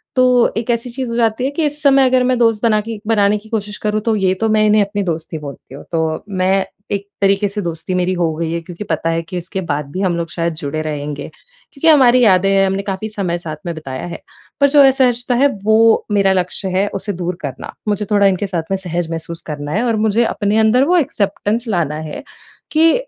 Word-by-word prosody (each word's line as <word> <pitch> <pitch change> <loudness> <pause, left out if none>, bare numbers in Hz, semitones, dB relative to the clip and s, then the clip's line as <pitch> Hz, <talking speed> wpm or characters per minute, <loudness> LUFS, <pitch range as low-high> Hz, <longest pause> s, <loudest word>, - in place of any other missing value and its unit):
तो 250 -1 +4
एक 225 +1 -3
ऐसी 235 +1 -2
चीज़ 255 0 -4
हो - - -3
जाती 230 0 +1
है 270 - +1
कि 315 +3 -2
इस 295 +1 -3
समय 275 -2 +5
अगर 255 0 +3
मैं 250 0 +1
दोस्त 225 -2 +2
बना 215 -2 +3
के 225 -1 -6
बनाने 210 -2 +3
की 215 +1 -14
कोशिश 210 -2 -3
करूँ 210 0 0
तो, 225 0 0
ये 190 -3 +2
तो 225 - +2
मैं 215 0 +3
इन्हें 215 0 +4
अपनी 200 0 -1
दोस्त 165 -1 -4
ही 160 - -2
बोलती 140 -2 -10
हूँ। - - -10
तो 160 0 -1
मैं 190 0 +1 0.3
एक 200 0 -2
तरीके 200 +1 +3
से 205 +1 -4
दोस्ती 170 +1 -4
मेरी 180 0 +1
हो 175 -3 0
गयी 165 0 -3
है। 170 - -1
क्योंकि 175 +3 -8
पता 165 -3 -2
है 165 - 0
कि 180 +2 -6
इसके 185 +2 -4
बाद 145 -1 -3
भी 185 - -4
हम 180 -3 0
लोग 165 -1 -3
शायद 170 -1 -2
जुड़े 155 -1 -3
रहेंगे। 150 -1 -5 0.4
क्योंकि 315 +3 -1
हमारी 255 -5 +6
यादें 195 -2 +4
हैं, 195 0 +4
हमने 195 +1 -2
काफ़ी 205 +3 -4
समय 190 -5 -2
साथ 160 -3 -6
में 170 - -2
बिताया 135 -3 -6
है, 170 - -7 0.4
पर 280 - +6
जो 285 0 +6
असहजता 250 -2 +2
है, 280 +3 +4 0.2
वो 220 +1 +4
मेरा 195 -2 +3
लक्ष्य 185 +1 -2
है 200 +2 +2
उसे 205 - -3
दूर 175 0 -3
करना। 140 -3 -6 0.2
मुझे 205 0 0
थोड़ा 200 -1 +4
इनके 195 +1 0
साथ 175 -4 -2
में 195 - +1
सहज 175 -3 -3
महसूस 165 +1 -5
करना 145 -1 -5
है 215 +8 0
और 230 - +1
मुझे 220 +3 +2
अपने 210 -1 0
अंदर 220 +4 +4
वो 355 +2 +3
एक्सेप्टेंस 220 - -1
लाना 170 -7 0
है - - -7 0.5
कि 320 +1 +5
200 Hz, 235 wpm, -17 LUFS, 170-230 Hz, 0.5 s, हमारी